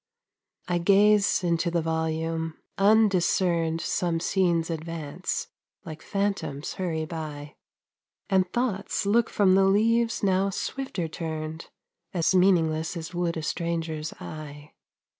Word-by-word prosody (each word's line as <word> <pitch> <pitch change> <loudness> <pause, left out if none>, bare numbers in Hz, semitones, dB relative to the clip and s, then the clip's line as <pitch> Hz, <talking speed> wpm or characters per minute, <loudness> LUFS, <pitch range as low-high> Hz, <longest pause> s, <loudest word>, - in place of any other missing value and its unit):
I 175 -1 +1
gaze 200 +2 +4
into 170 0 +1
the 170 -1 0
volume. 160 0 -2 0.2
Undiscerned 185 -5 +3
Some 170 -2 0
scenes 170 -2 +1
advance, 165 - -4 0.4
like 155 -1 -8
phantoms 195 -8 -2
hurry 165 -4 -2
by, 150 -3 -7 0.7
And 185 -2 +2
thoughts 215 -5 -1
look 225 +3 +3
from 195 -3 +3
the 195 0 +5
leaves 225 +4 +2
now 195 0 +2
swifter 200 -3 -3
turned 160 0 -5 0.5
As 170 +1 +2
meaningless 170 -3 +2
as 165 +1 -7
would 175 -1 -1
a 160 - -4
stranger's 165 -1 -3
eye. 150 -1 -9
170 Hz, 115 wpm, -26 LUFS, 160-195 Hz, 0.7 s, the